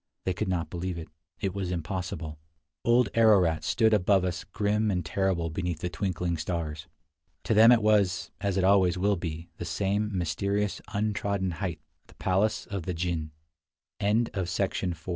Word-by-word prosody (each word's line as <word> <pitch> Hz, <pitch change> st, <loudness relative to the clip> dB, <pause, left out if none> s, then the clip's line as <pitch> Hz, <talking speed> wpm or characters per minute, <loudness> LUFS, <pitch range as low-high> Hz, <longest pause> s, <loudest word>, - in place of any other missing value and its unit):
They 95 Hz, -, 0 dB
could -, -, -2 dB
not 90 Hz, -3 st, -1 dB
believe 90 Hz, 0 st, -3 dB
it. 80 Hz, -, -7 dB, 0.3 s
It 95 Hz, -2 st, -1 dB
was 95 Hz, -2 st, -3 dB
impossible. 85 Hz, -2 st, -4 dB, 0.4 s
Old 120 Hz, -1 st, +4 dB
Ararat 100 Hz, -8 st, +4 dB
stood 110 Hz, -2 st, +3 dB
above 95 Hz, -2 st, +3 dB
us 90 Hz, -1 st, -3 dB
grim 105 Hz, +1 st, 0 dB
and 90 Hz, -4 st, -1 dB
terrible 90 Hz, -3 st, 0 dB
beneath 85 Hz, -1 st, -3 dB
the 90 Hz, -, -2 dB
twinkling 90 Hz, -3 st, -2 dB
stars. 80 Hz, -1 st, -4 dB, 0.6 s
To -, -, +1 dB
them 110 Hz, +2 st, +8 dB
it 115 Hz, -3 st, +5 dB
was, 100 Hz, -4 st, +2 dB
as 100 Hz, -2 st, 0 dB
it 95 Hz, -, +2 dB
always 95 Hz, -2 st, +4 dB
will 100 Hz, +2 st, +2 dB
be, 85 Hz, -1 st, -6 dB
the -, -, -5 dB
same 100 Hz, +5 st, 0 dB
mysterious, 100 Hz, +4 st, -1 dB
untrodden 100 Hz, -2 st, -1 dB
height 85 Hz, -2 st, -4 dB
— -, -, -44 dB
the -, -, -19 dB
pal 95 Hz, +3 st, +2 dB
95 Hz, 145 wpm, -28 LUFS, 85-100 Hz, 0.6 s, them